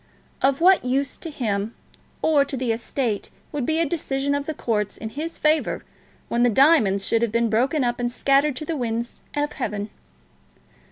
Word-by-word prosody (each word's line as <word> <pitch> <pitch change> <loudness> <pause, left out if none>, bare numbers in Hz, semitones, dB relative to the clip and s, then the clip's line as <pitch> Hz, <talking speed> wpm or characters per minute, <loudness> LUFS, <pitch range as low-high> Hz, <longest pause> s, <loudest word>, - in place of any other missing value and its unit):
Of 270 +2 +2
what 370 +2 +6
use 270 +3 0
to 330 - -5
him 220 -6 -2 0.5
or 300 -3 +4
to 275 -1 -5
the 250 -2 0
estate 230 -1 -2 0.2
would 285 -4 -2
be 315 - +1
a 335 - +2
decision 280 -3 -1
of 285 0 -2
the 315 - -1
courts 210 -5 -1
in 220 - -5
his 315 +7 -5
favour 310 0 +1 0.4
when 235 - 0
the 245 - +5
diamonds 225 -7 +4
should 230 +2 +1
have 235 -2 +1
been 230 0 +1
broken 260 +6 +2
up 240 0 -1
and 240 0 -1
scattered 275 +3 +2
to 305 - -4
the 330 - -2
winds 235 -2 -3
of 295 0 0
heaven? 210 -4 -3
260 Hz, 185 wpm, -23 LUFS, 230-295 Hz, 0.5 s, what